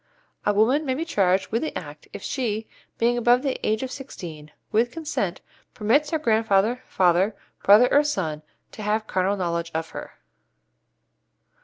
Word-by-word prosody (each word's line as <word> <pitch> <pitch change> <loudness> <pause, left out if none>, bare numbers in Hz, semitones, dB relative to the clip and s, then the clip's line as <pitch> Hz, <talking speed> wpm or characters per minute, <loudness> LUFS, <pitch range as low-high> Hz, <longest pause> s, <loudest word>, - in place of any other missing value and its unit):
A - - +5
woman 230 +9 +3
may 260 -3 -1
be 320 +4 -3
charged 195 - +1
under 230 - +2
the 315 - -3
Act - - -9
if - - -8
she, 225 -5 -2 0.3
being 240 +1 +2
above 245 +2 +4
the 270 -2 -2
age 215 +3 0
of 260 - -4
sixteen, 165 - -8 0.2
with 230 +3 +3
consent 295 - -3 0.3
permits 270 +8 +2
her 320 - +1
grandfather, 225 -2 +2
father, 185 +3 +2 0.3
brother, 210 +5 +7
or 290 - +6
son, 165 - -2 0.3
to - - -9
have 215 +1 0
carnal 190 0 0
knowledge 170 -2 -2
of 160 0 -2
her. - - -8
220 Hz, 160 wpm, -24 LUFS, 190-255 Hz, 0.3 s, brother